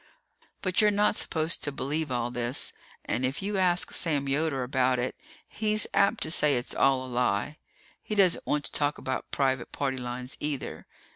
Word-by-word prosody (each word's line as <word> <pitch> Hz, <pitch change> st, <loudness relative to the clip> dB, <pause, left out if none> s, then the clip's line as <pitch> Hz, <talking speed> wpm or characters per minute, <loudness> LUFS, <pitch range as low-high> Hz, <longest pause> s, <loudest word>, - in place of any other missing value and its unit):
But 185 Hz, +2 st, +2 dB
you're 210 Hz, -, +5 dB
not 210 Hz, +1 st, +2 dB
supposed 160 Hz, -3 st, +1 dB
to 145 Hz, -, +1 dB
believe 145 Hz, +2 st, -3 dB
all 120 Hz, -1 st, -1 dB
this, 120 Hz, +2 st, -1 dB, 0.3 s
and 120 Hz, -, -1 dB
if 130 Hz, +8 st, -2 dB
you 200 Hz, 0 st, -1 dB
ask 180 Hz, -1 st, +2 dB
Sam 145 Hz, -5 st, +1 dB
Yoder 140 Hz, -1 st, 0 dB
about 130 Hz, 0 st, +1 dB
it, 125 Hz, +1 st, -2 dB, 0.3 s
he's 215 Hz, -1 st, +1 dB
apt 200 Hz, +3 st, +3 dB
to 155 Hz, -, -2 dB
say 150 Hz, -3 st, +5 dB
it's 120 Hz, -, -4 dB
all 135 Hz, -1 st, +2 dB
a -, -, -8 dB
lie. 125 Hz, +2 st, -1 dB, 0.4 s
He 215 Hz, -, -4 dB
doesn't 190 Hz, -4 st, +3 dB
want 145 Hz, 0 st, 0 dB
to -, -, -3 dB
talk 145 Hz, 0 st, 0 dB
about 130 Hz, 0 st, -4 dB
private 135 Hz, -2 st, 0 dB
party 135 Hz, -2 st, -2 dB
lines, 125 Hz, +1 st, -6 dB
either. 145 Hz, -3 st, -4 dB
140 Hz, 185 wpm, -28 LUFS, 130-170 Hz, 0.4 s, you're